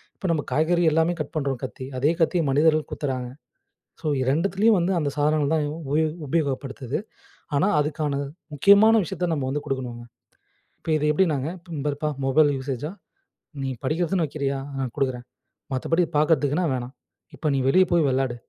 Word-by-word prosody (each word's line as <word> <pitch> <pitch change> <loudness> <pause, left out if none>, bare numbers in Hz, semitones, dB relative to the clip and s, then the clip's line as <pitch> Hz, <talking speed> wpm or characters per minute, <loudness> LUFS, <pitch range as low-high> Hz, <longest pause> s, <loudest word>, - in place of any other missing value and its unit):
இப்ப 190 - -4
நம்ம 150 -3 0
காய்கறி 170 +3 +2
எல்லாமே 165 +2 +2
கட் 155 +3 -4
பண்றோம் 135 -4 -1
கத்தி. 130 0 -6
அதே 145 +5 +3
கத்திய 165 +1 +2
மனிதர்கள் 155 +2 +3
குத்துறாங்க. 130 -4 -3 0.7
ஸோ, - - -11 0.2
2த்துலாயும் 195 - +2
வந்து 175 +3 +1
அந்த 145 -2 0
சாதனங்கள் 150 0 +2
தான் 150 - +1
உ - - -6
உபயோ 155 +2 +2 0.2
உபயோகப்படுத்து. 135 -3 -2 0.6
ஆனா, 185 - +3
அதுக்கான 150 0 -1 0.4
முக்கியமான 200 +8 +6
விஷயத்த 180 0 -3
நம்ம 135 -3 -2
வந்து 145 +1 -3
கொடுக்கணும்ங்க. 125 -3 -4 0.8
இப்ப 160 - -4
இது 150 0 0
எப்பிடினாங்க 150 -5 +1 0.3
இந்த 140 - -3
பாருப்பா! 145 +1 -2 0.2
மொபைல் 145 +2 +4
யூஸேஸா! 135 +3 -4 0.7
நீ 135 - -1 0.2
படிக்கிறதுன்னு 170 +3 +1
வைக்கிறியா, 140 -1 -2 0.2
ஆ 135 - -2 0.2
கொடுக்குறேன். 125 -3 -1 0.5
மத்தபடி 165 +7 +1
பார்க்கிறதுக்குன்னா 150 +2 +2
வேணாம். 125 +1 -5 0.4
இப்ப - - -11
நீ - - +1
வெளிய 185 +5 +6
போய் 165 -4 +4
வெளாடு. 130 -2 0
150 Hz, 155 wpm, -24 LUFS, 135-165 Hz, 0.8 s, முக்கியமான